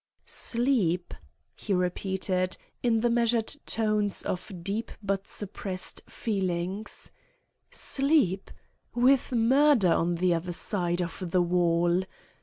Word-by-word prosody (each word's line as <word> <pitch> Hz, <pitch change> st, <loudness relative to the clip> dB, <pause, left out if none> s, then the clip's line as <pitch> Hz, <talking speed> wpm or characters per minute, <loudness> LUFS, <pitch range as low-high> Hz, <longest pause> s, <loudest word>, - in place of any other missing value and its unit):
"Sleep!" 225 Hz, -9 st, +1 dB, 0.4 s
he 200 Hz, -, -3 dB
repeated, 185 Hz, 0 st, -1 dB, 0.2 s
in 230 Hz, -2 st, +2 dB
the 240 Hz, -, +2 dB
measured 235 Hz, 0 st, +1 dB
tones 215 Hz, -2 st, +1 dB
of 180 Hz, +3 st, -4 dB
deep 210 Hz, +5 st, -3 dB
but 195 Hz, -1 st, -2 dB
suppressed 195 Hz, -2 st, -4 dB
feeling. 190 Hz, -1 st, -2 dB, 0.8 s
"Sleep! 275 Hz, -, +2 dB, 0.5 s
with 255 Hz, +2 st, +3 dB
murder 245 Hz, -, +4 dB
on 170 Hz, +1 st, +1 dB
the 180 Hz, +1 st, +2 dB
other 170 Hz, +1 st, -3 dB
side 175 Hz, -1 st, -1 dB
of 175 Hz, +1 st, -6 dB
the 180 Hz, +1 st, +3 dB
wall!" 175 Hz, 0 st, +2 dB
195 Hz, 105 wpm, -28 LUFS, 180-230 Hz, 0.8 s, murder